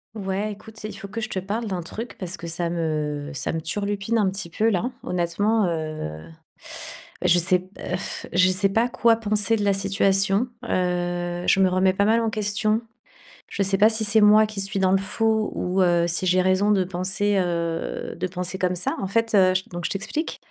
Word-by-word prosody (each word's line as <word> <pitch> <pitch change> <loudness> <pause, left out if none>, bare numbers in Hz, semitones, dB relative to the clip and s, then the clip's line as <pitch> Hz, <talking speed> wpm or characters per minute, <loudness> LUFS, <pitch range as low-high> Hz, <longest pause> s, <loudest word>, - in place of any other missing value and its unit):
Ouais 200 +1 -2
écoute, 220 +2 -12
c'est 215 - -6
il 205 - -9
faut 200 - -8
que 220 +3 -5
je 220 - -4
te 190 - -2
parle 210 +5 -3
d'un 185 -3 -3
truc 215 +6 -7
parce 185 -1 -5
que - - -10
ça 170 +1 -2
me 150 -3 -2
ça 135 - -2
me 165 - -2
turlupine 200 +6 -2
un 205 -3 +2
petit 190 -2 -5
peu 215 +7 +1
là. 225 +5 -1
Honnêtement, 190 +5 0
heu, 155 - -4 1.0
je 175 +1 +5
sais 180 +1 +3
p 185 +1 -16
heu, 180 - -3
f - - -6
je 185 +1 +5
sais 185 +2 +2
pas 225 +5 +1
quoi 230 -1 +3
penser 215 0 +1
de 210 - -2
la 200 - +4
situation, 195 +3 +2 0.2
heu, 175 -1 -1
je - - +4
me 190 - +5
remets 185 +1 +2
pas 200 - +1
mal 225 +2 +3
en 225 - 0
question. 215 +1 0 0.7
Je 200 - -2
sais 195 0 +1
pas 215 +2 +6
si 220 0 +1
c'est 220 +1 +4
moi 210 +1 +6
qui 210 -2 -5
suis 195 0 +1
dans 190 -1 +3
le - - +5
faux, 220 +2 0
ou, 185 +1 0
heu, 175 -1 +3
si 170 +2 +1
j'ai 185 +1 +3
raison 190 +3 +2
de 190 -2 +2
penser, 190 +3 0
heu, 170 -2 -2
de 180 +2 -2
penser 180 +1 -5
comme 180 -1 0
ça. 180 - -1
En - - -1
fait, 225 +2 0
heu, 185 -2 +5 0.2
donc 175 0 -5
je - - -5
t'explique. 260 - -3
195 Hz, 215 wpm, -23 LUFS, 175-210 Hz, 1.0 s, pas